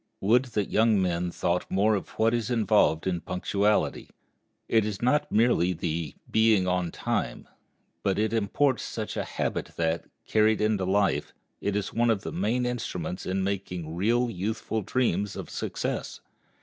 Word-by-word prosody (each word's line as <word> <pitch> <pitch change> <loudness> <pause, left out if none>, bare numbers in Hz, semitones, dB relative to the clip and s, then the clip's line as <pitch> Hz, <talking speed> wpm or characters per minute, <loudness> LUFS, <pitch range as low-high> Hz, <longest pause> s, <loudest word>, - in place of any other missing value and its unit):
Would 120 +6 +3
that 105 -2 0
young 110 -1 +4
men 90 -1 0
thought 85 +1 -1
more 105 +3 +3
of 100 - -2
what 115 +1 +3
is 115 -1 -1
involved 110 -8 +3
in 90 -2 -1
punctuality! 100 +3 0 0.6
It 110 -1 +3
is 105 -2 -3
not 125 +5 +1
merely 110 -5 +3
the 80 -2 -3 0.2
"being 110 -4 +4
on 90 -1 0
time," - - -3 0.5
but 95 - 0
it 110 +2 +1
imports 115 +5 +1
such - - -5
a - - -1
habit - - -3
that, 80 0 0 0.2
carried 110 0 +3
into 105 -3 +1
life, 100 +1 +1 0.3
it 100 0 -1
is 105 -1 -2
one 120 +1 +2
of 110 -4 +1
the - - -4
main 110 +7 0
instruments 90 -8 -4
in 95 +1 0
making 90 -4 -3
real 120 +7 +2
youthful 110 +2 -2
dreams 105 -3 0
of - - -7
success. - - -3
100 Hz, 160 wpm, -27 LUFS, 90-110 Hz, 0.6 s, young